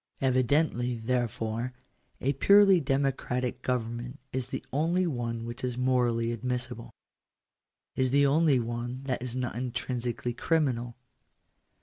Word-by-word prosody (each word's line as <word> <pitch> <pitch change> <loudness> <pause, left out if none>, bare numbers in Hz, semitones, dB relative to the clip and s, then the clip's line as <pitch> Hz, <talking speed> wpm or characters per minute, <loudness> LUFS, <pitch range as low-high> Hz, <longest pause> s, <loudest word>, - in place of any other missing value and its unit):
Evidently, 130 -1 +2
therefore, 120 0 -2 0.5
a 140 +2 +1
purely 200 +5 +6
democratic 130 -3 -1
government 120 +1 -3
is 130 -1 -2
the - - -5
only 170 +6 +2
one 115 -6 -3
which 120 +1 -7
is 125 -1 -2
morally 120 -2 +2
admissible 125 0 -3 0.6
— - - -58
is 130 -1 +2
the 140 +2 +4
only 150 0 +4
one 120 +2 -4
that 130 -3 -2
is 125 -1 -5
not 125 -3 -2
intrinsically 120 -1 -3
criminal. 125 -6 0
125 Hz, 120 wpm, -29 LUFS, 120-135 Hz, 0.6 s, purely